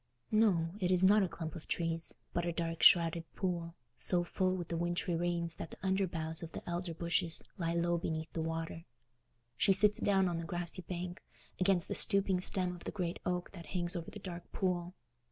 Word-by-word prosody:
No, 195 -7 +3
it 180 -3 +1
is 185 0 +4
not 205 +3 +6
a 190 - +2
clump 160 -2 -6
of 160 - -8
trees, 165 -1 -1 0.2
but 175 - 0
a 170 - 0
dark 165 0 -3
shrouded 170 -2 +6
pool, 170 -3 -2 0.2
so 175 -1 +1
full 185 +1 0
with 175 -3 -5
the 170 - -2
wintry 175 +1 0
rains 170 -1 -1
that - - -6
the - - -11
under 190 0 +2
boughs 160 -1 -2
of 165 -1 -7
the - - -8
elder 175 -1 -3
bushes 170 0 -1 0.2
lie 170 -1 0
low 170 0 +1
beneath 160 -1 -3
the 165 - -2
water. 165 +1 -4 0.7
She 195 - +4
sits 210 +3 +4
down 195 -3 +3
on 170 -2 -1
the - - -4
grassy 175 +2 -3
bank, 180 +1 -5 0.4
against 185 -2 +3
the - - -2
stooping 195 -2 +4
stem 180 -1 +2
of 175 - -13
the - - -3
great 180 -4 -3
oak 180 0 -2
that 170 -4 -10
hangs 175 +1 +1
over 170 -1 -4
the - - -9
dark 175 -3 -8
pool. 180 -1 -1
175 Hz, 210 wpm, -34 LUFS, 165-185 Hz, 0.7 s, not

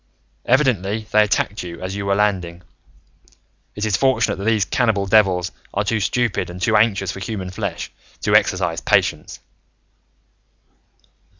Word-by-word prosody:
Evidently, 110 -6 +1
they 105 - +5
attacked 105 0 0
you 85 -2 -8
as 95 +1 -5
you 100 0 -4
were 100 - +2
landing. 90 -4 -1 1.1
It 105 - -2
is 105 - +1
fortunate 130 -5 +1
that 100 - -6
these 110 -4 +2
cannibal 110 0 +1
devils 95 -3 +3 0.2
are 100 - +1
too 110 +1 0
stupid 115 0 -1
and 90 +1 -8
too 100 +5 +1
anxious 100 -3 +2
for - - -8
human 95 -2 -5
flesh 100 -3 -5 0.3
to - - 0
exercise 90 -3 +2
patience." - - 0
100 Hz, 140 wpm, -20 LUFS, 95-110 Hz, 1.1 s, they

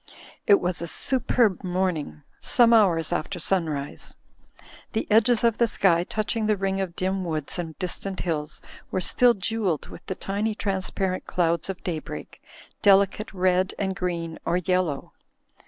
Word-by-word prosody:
It 200 - +7
was 180 -1 -1
a 170 - -3
superb 240 -2 +1
morning, 175 - -2 0.2
some 235 -1 +4
hours 175 -8 +4
after - - -3
sunrise. 155 -7 -1 0.8
The 220 - -1
edges 230 +2 +4
of 230 -2 +2
the 235 - +4
sky 175 -5 +2
touching 215 +2 -2
the 215 -1 +2
ring 195 0 -1
of 180 -3 -4
dim 190 +1 -1
woods 160 -1 -3
and 165 -2 -5
distant 190 +1 -3
hills 155 -3 -3 0.3
were - - -1
still 240 +6 +4
jewelled 195 -5 -1
with - - -11
the 190 - -3
tiny 210 +3 -2
transparent 190 -2 -2
clouds 170 0 0
of 190 - -5
daybreak, 165 -4 -6 0.4
delicate 200 +1 +3
red 185 0 +1
and 190 -1 -2
green 170 -3 -3
or 175 - +1
yellow. 180 -5 -1
185 Hz, 150 wpm, -25 LUFS, 170-205 Hz, 0.8 s, It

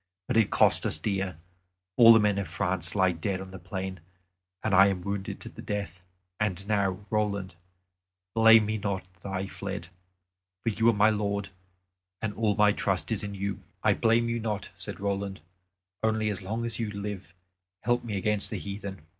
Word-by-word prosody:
But 125 - -1
it 115 - +4
cost - - +6
us - - +2
dear; 95 -4 -2 0.6
all 115 -1 +9
the 115 - +8
men 105 -2 +2
of 100 - -3
France 90 0 -1
lie 95 -2 +4
dead 95 +3 -3
on 95 0 -8
the 95 - -9
plain, 95 +1 -5 0.6
and 110 - 0
I 95 +1 +8
am 95 -3 -2
wounded 100 0 -4
to - - -8
the - - -11
death. 100 -3 -4 0.4
And 100 -2 -1
now, 100 -2 0
Roland, 100 -4 -1 0.8
blame 115 -1 +7
me 110 +1 -2
not 100 -2 -2 0.2
that 100 - -6
I 95 0 -2
fled; 85 -3 -6 0.7
for - - +1
you 115 +2 +3
are - - +4
my 105 +1 +4
lord, 100 -1 -2 0.7
and 110 -2 -3
all 105 -2 +1
my 105 0 +5
trust 95 0 -1
is 105 -2 -1
in 100 0 -5
you." 100 0 -3 0.2
"I - - +5
blame 115 +1 +2
you 115 0 -1
not," 105 -3 -3
said - - -7
Roland, 100 -2 -3 0.6
"only 110 -1 +1
as 100 - -5
long 110 +5 -3
as 115 0 -3
you 115 -2 -1
live 100 -3 -6 0.5
help 120 +1 +1
me 110 -4 -3
against 105 +1 0
the - - -3
heathen." 100 -2 -6
100 Hz, 190 wpm, -28 LUFS, 95-110 Hz, 0.8 s, all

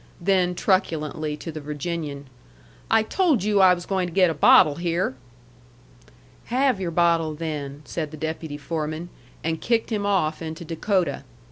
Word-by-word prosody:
Then, 180 -1 +2
truculently, 155 -6 0
to 165 - -7
the 155 -1 -7
Virginian, 150 -1 -4 0.6
"I 225 -1 +4
told 310 - +1
you 205 -1 +3
I 185 -1 +7
was 175 0 -8
going 190 -2 -1
to - - -7
get 180 -1 +4
a - - -2
bottle 145 0 +6
here." 170 -3 -1 1.3
"Have 255 -4 +1
your 180 - -1
bottle, 165 -2 +2
then," 150 -3 -5
said 155 -3 -4
the 155 - -10
deputy 160 -1 -4
foreman, 155 +2 -4 0.3
and 160 0 -2
kicked 230 0 0
him 205 -2 -1
off 160 -6 +1
into 160 +1 -6
Dakota. 165 -2 -1
165 Hz, 155 wpm, -24 LUFS, 155-190 Hz, 1.3 s, I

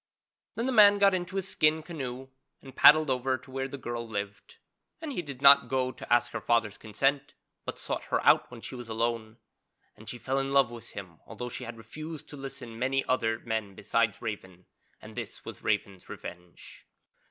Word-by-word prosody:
Then 230 - -1
the 260 - +1
man 205 -4 +7
got 200 -1 +5
into 185 +1 -3
his 195 -1 -2
skin 155 -3 +2
canoe 135 -6 -6 0.3
and 135 -1 -13
paddled 155 -1 +7
over 130 +1 0
to 130 +1 -16
where 135 0 -2
the 140 - -7
girl 120 -2 -5
lived, 100 -2 -6 0.4
and 315 -3 -5
he 180 - -2
did 140 -4 -9
not 140 0 +8
go 130 -1 0
to - - -11
ask 120 0 +3
her 110 - -4
father's 115 -3 +1
consent 135 +6 -1 0.3
but - - -5
sought - - -4
her - - 0
out - - +5
when 120 -2 -11
she - - -7
was 120 -2 -8
alone, 115 0 -2 0.6
and 110 +1 -10
she 120 - -4
fell 135 +2 -1
in 135 0 -2
love 135 -4 +4
with 120 -1 -10
him 90 -6 -9
although 125 - -6
she - - -6
had 120 0 -8
refused 155 +6 -8
to - - -8
listen 135 -3 -7
to 115 - -10
many 135 +3 0
other 115 -3 0
men 110 -4 -3
besides 115 +1 0
Raven, 95 -5 -6 0.3
and - - -12
this - - -7
was - - -8
Raven's 95 -2 -2
revenge. 90 0 -10
130 Hz, 200 wpm, -29 LUFS, 115-140 Hz, 0.6 s, not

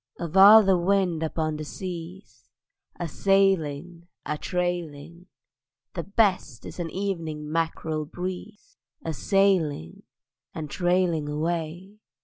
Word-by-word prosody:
Of 170 0 -5
all 205 +3 +9
the 190 -2 +3
wind 180 -2 +1
upon 155 -1 -2
the 155 - -5
seas, 180 +3 -8 0.5
A 175 - -2
sailing, 175 -3 0 0.2
a 150 - -2
trailing; 175 -1 -4 0.7
The 170 - -3
best 195 - 0
is - - -9
an 170 -1 -3
evening 160 -6 -4
mackerel 160 -1 -2
breeze: 185 +6 -7 0.3
A 160 - -2
sailing 175 - +1 0.5
and 155 -3 -6
trailing 175 -4 +1
away. 170 +6 -4
170 Hz, 115 wpm, -25 LUFS, 155-190 Hz, 0.7 s, all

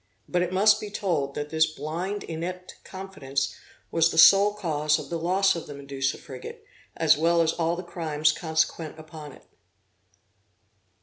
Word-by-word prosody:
But 180 - 0
it 180 0 -1
must 210 +3 +4
be 210 - -6
told, 165 -9 -2
that 150 0 -5
this 160 0 +3
blind 165 +7 -4
inept 180 +3 -7
confidence 140 -8 -4 0.4
was 165 0 +3
the 160 - -5
sole 200 +5 +7
cause 155 -6 0
of - - -9
the 170 - -2
loss 190 +3 +2
of 165 - -6
the 145 - -8
Medusa 140 -1 -3
frigate, 130 -2 -10 0.3
as 160 -2 +4
well 170 +1 +3
as 165 -1 +2
all 165 0 0
the 180 - -6
crimes 155 -3 0
consequent 160 -1 -2
upon 155 -1 -10
it. - - -16
165 Hz, 165 wpm, -26 LUFS, 150-180 Hz, 0.4 s, sole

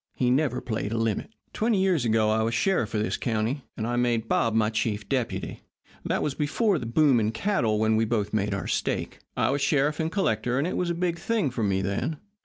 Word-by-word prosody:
He 125 -1 +1
never 130 -1 +1
played 110 -4 -3
a 115 - -1
limit. 115 -2 -1 0.2
"Twenty 220 -2 +1
years 185 -9 +2
ago 110 -1 +3
I 110 +1 +2
was 115 +1 0
sheriff 120 - +1
of 105 - +1
this - - -1
county, 115 +4 -1
and 110 - -2
I 120 +1 -1
made 120 -2 +1
Bob 115 -1 +1
my 110 -1 +2
chief 105 -2 -2
deputy. 125 0 -2 0.4
That - - -1
was 150 - -1
before 170 - +1
the 115 - -5
boom 135 +1 +4
in 110 0 +1
cattle 115 - 0
when 110 +1 +2
we 115 - +2
both 105 -2 -1
made 105 -1 0
our 100 - -4
stake. - - -2 0.2
I - - +2
was 140 0 -1
sheriff 145 +1 +2
and 160 0 -1
collector, 125 - 0
and 140 - +1
it 180 - -2
was 180 - 0
a 170 - -1
big 170 -1 -1
thing 210 - 0
for 120 - -3
me 95 -2 +1
then. 100 - -2
120 Hz, 230 wpm, -26 LUFS, 110-150 Hz, 0.4 s, boom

